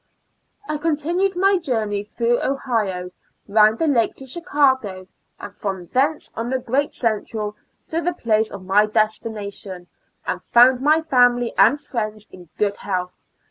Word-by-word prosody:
I 305 -1 -2
continued 335 +5 0
my 385 +1 +3
journey 220 - -2
through 235 +3 0
Ohio, 215 -10 -2 0.4
around 215 +1 +4
the 325 - 0
lake 245 -7 +2
to 270 - -11
Chicago, 265 - 0 0.3
and - - -9
from 190 -3 -4
thence 290 +4 0
on 230 +1 -3
the 260 - +1
great 260 +3 -1
Central 215 -2 -2 0.3
to 330 +1 -1
the 350 +1 -1
place 220 -7 +1
ot 195 -2 -8
my 200 +3 +3
destination, 210 -4 -2 0.4
and - - -3
found 250 +1 +5
my 310 +3 +3
family 245 -4 +3
and 280 +7 +5
friends 215 -5 -5
in 175 -3 -14
good 205 -1 0
health. 180 -2 -4
230 Hz, 145 wpm, -21 LUFS, 210-285 Hz, 0.4 s, found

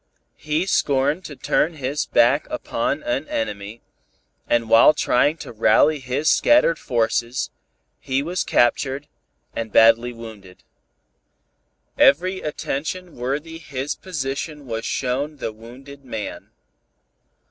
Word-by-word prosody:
He 155 +3 -1
scorned 145 -1 +1
to 145 - -8
turn 160 +4 0
his 140 +1 -3
back 130 +5 +3
upon 125 +4 -2
an 135 +5 -2
enemy, 105 0 -4 0.7
and 115 -1 +2
while 115 +7 +6
trying 145 +6 +2
to - - -9
rally 145 +7 +3
his 130 +4 -2
scattered 295 - +4
forces, 120 0 -1 0.5
he 135 +1 -1
was 175 +4 -2
captured, 135 +3 +1 0.5
badly 115 +2 +4
wounded. 110 -6 -12 1.4
Every 185 +6 +4
attention 160 +4 -4
worthy 145 +7 -4
his 135 -3 -4
position 150 -3 -5
was 115 -2 -4
shown 140 +4 -2
the 115 - -4
wounded 130 +6 -13
man. 110 -5 -6
135 Hz, 110 wpm, -22 LUFS, 115-150 Hz, 1.4 s, while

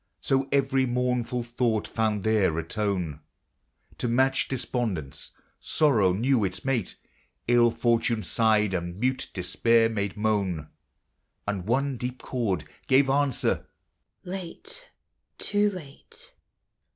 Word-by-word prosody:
So 135 0 0
every 135 -1 +2
mournful 125 0 0
thought 120 -2 0
found 110 -3 0
there 105 -7 +2
a 85 - -1
tone 90 -5 -2 0.8
To - - 0
match 130 +3 +2
despondence: 115 - -3 0.3
sorrow 115 -12 +3
knew 115 +5 +2
its 95 +4 -3
mate; 125 -8 -1 0.5
111 120 -1 +4
fortune 115 -2 +2
sighed, 110 -3 +2
and 85 +1 -3
mute 130 +2 0
despair 115 +5 +2
made 100 -2 -2
moan; 100 -8 0 0.8
And 100 -2 -2
one 135 +3 +1
deep 125 +2 -4
chord 105 - -1 0.2
gave 135 0 +4
answer, 140 -2 +1 0.3
" - - -52
Late, 190 - -6 0.2
— - - -52
too 205 0 +2
late." 205 - -9
115 Hz, 120 wpm, -27 LUFS, 100-135 Hz, 0.8 s, 111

